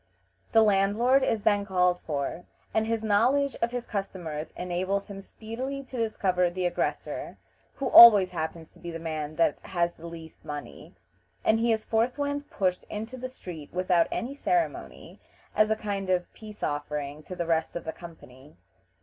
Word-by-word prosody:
The 225 - +6
landlord 210 +6 +3
is 225 -5 0
then 205 -2 +3
called 180 -2 +2
for, 145 +3 -4 0.3
and 220 0 +1
his 225 -1 -1
knowledge 250 +7 +2
of 230 - +2
his 245 0 -4
customers 175 -7 -5
enables 185 +3 -2
him 195 0 -7
speedily 255 +7 -6
to 260 - -11
discover 190 -6 +1
the 180 +1 -3
aggressor, 175 0 -3 0.4
who 275 - -4
always 210 -7 +10
happens 160 -1 -4
to - - -21
be 175 - -7
the 165 - -5
man 155 -2 -4
that 165 -3 +2
has 175 -2 -1
the 170 - -11
least 165 -1 -11
money, 145 -1 -8 0.5
and 220 0 +4
he 230 0 +2
is 220 -1 0
forthwith 285 +5 -1
pushed 185 -2 -1
into 220 +4 -6
the 255 0 -6
street 170 - -9
without 180 -2 +2
any 250 +4 -3
ceremony, 340 +4 -2 0.4
as 215 0 +4
a 220 - +2
kind 200 -3 -4
of 180 -1 0
peace 215 -1 -11
offering 145 0 -3
to 180 +4 -8
the 175 - -2
rest 165 -1 0
of 170 - -4
the 160 - -4
company. 150 - -14
195 Hz, 170 wpm, -27 LUFS, 170-225 Hz, 0.5 s, always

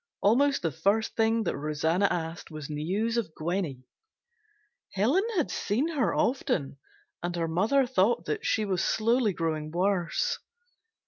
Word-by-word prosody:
Almost 275 +5 +3
the 165 - +1
first 205 - 0
thing 225 0 +2
that - - -1
Rosanna 160 +6 +1
asked 165 0 -4
was 155 -2 -7
news 195 +10 -1
of 200 -9 -2
Gwenny. 160 -6 -2 1.1
Helen 255 - +2
had 320 - +1
seen 245 +11 0
her 260 - +1
often 145 - 0 0.4
and 175 0 -3
her 165 -1 -1
mother 215 +12 +2
thought 215 -5 +2
that 150 - -2
she 215 - +1
was 190 -2 0
slowly 230 0 +2
growing 160 -3 -2
worse. 185 - 0
195 Hz, 140 wpm, -28 LUFS, 165-230 Hz, 1.1 s, Almost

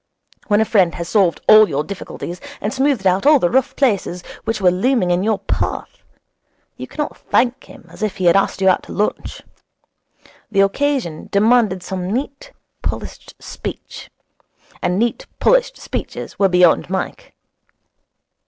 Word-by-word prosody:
When 205 -2 +3
a - - +2
friend 190 -6 +2
has 170 - -5
solved 195 -6 +2
all 215 -1 +8
your 140 +2 -1
difficulties 180 -1 -7 0.2
and 210 - -3
smoothed 265 -6 0
out 190 +7 +2
all 300 0 +7
the 175 -10 0
rough 260 0 +1
places 200 -9 0 0.2
which 225 -1 -1
were 185 -2 +4
looming 190 0 +1
in 175 +1 +1
your 215 +1 +1
path, 200 - -4 0.7
you - - -8
cannot 295 -1 -4
thank 245 +1 0
him - - -15
as - - -15
if 215 -3 -2
he 185 - -2
had 170 - +5
asked 195 0 +1
you 190 -1 +5
to - - -13
lunch. 210 - -3 1.1
The 195 -2 +2
occasion 210 - -1
demanded 215 -3 +3
some 185 -1 -4
neat, 275 - -4 0.3
polished - - -6
speech; - - -8 0.7
and 180 +1 0
neat, 235 +3 -1
polished - - +2
speeches - - -6
were 195 -1 +4
beyond 180 -1 +3
Mike. 190 - -5
200 Hz, 155 wpm, -19 LUFS, 180-245 Hz, 1.1 s, all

